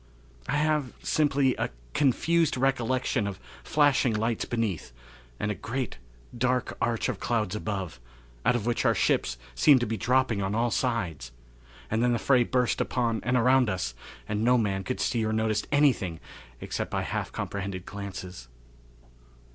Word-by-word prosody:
I 145 Hz, -, +1 dB
have 150 Hz, -3 st, +1 dB
simply 140 Hz, -3 st, +2 dB
a -, -, -1 dB, 0.2 s
confused 160 Hz, +3 st, +2 dB
recollection 130 Hz, -3 st, +1 dB
of 95 Hz, -2 st, -5 dB, 0.2 s
flashing 140 Hz, -5 st, +3 dB
lights 115 Hz, +1 st, 0 dB
beneath, 110 Hz, -, -2 dB, 0.5 s
and 105 Hz, -, -1 dB
a -, -, 0 dB
great, 120 Hz, -, -4 dB, 0.4 s
dark 125 Hz, +1 st, 0 dB
arch 115 Hz, -2 st, 0 dB
of 120 Hz, -6 st, -3 dB
clouds 110 Hz, -4 st, -1 dB
above, 95 Hz, -, -4 dB, 0.4 s
out 125 Hz, -, +3 dB
of 115 Hz, -3 st, -2 dB
which 120 Hz, -1 st, 0 dB
our -, -, +3 dB
ships -, -, +1 dB, 0.2 s
seemed 120 Hz, -, +5 dB
dropping 125 Hz, -2 st, +2 dB
on 95 Hz, +2 st, -1 dB
all 120 Hz, +1 st, +1 dB
sides, 90 Hz, -, -1 dB, 0.6 s
and 110 Hz, +1 st, +1 dB
then 120 Hz, 0 st, +3 dB
the -, -, +2 dB
fray 125 Hz, +1 st, +4 dB
burst 125 Hz, 0 st, +1 dB
upon 115 Hz, -3 st, 0 dB
and 125 Hz, +2 st, +2 dB
around 125 Hz, 0 st, +4 dB
us, 90 Hz, -11 st, -2 dB, 0.3 s
and 105 Hz, +1 st, -1 dB
no 125 Hz, +2 st, +5 dB
man 100 Hz, -4 st, 0 dB
could 130 Hz, -, -3 dB
see 115 Hz, -3 st, 0 dB
or 110 Hz, -, 0 dB
notice 110 Hz, -1 st, 0 dB
anything 130 Hz, -, +2 dB, 0.4 s
except -, -, -3 dB
by -, -, -1 dB
half -, -, -3 dB
comprehended 95 Hz, -2 st, -4 dB
glances. 95 Hz, -8 st, -7 dB
115 Hz, 155 wpm, -27 LUFS, 100-130 Hz, 0.6 s, seemed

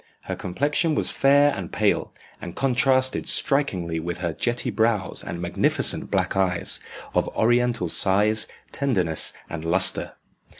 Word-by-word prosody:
Her -, -, -5 dB
complexion 145 Hz, -, -1 dB
was -, -, +1 dB
fair 145 Hz, +1 st, +3 dB
and 95 Hz, -4 st, -7 dB
pale, -, -, 0 dB, 0.3 s
and 85 Hz, -, -8 dB
contrasted 130 Hz, 0 st, +2 dB
strikingly 95 Hz, -, +1 dB
with 85 Hz, +2 st, -5 dB
her 85 Hz, -2 st, -3 dB
jetty 120 Hz, +7 st, -2 dB
brows 110 Hz, -4 st, -1 dB
and 85 Hz, -, -6 dB
magnificent 85 Hz, 0 st, +1 dB
black -, -, -1 dB
eyes, 90 Hz, -3 st, +1 dB, 0.3 s
of -, -, 0 dB
oriental 120 Hz, -4 st, +1 dB
size, 105 Hz, +5 st, +3 dB, 0.2 s
tenderness, 95 Hz, -, 0 dB, 0.2 s
and 80 Hz, -1 st, -7 dB
lustre. 95 Hz, +3 st, +1 dB
105 Hz, 130 wpm, -23 LUFS, 90-130 Hz, 0.3 s, fair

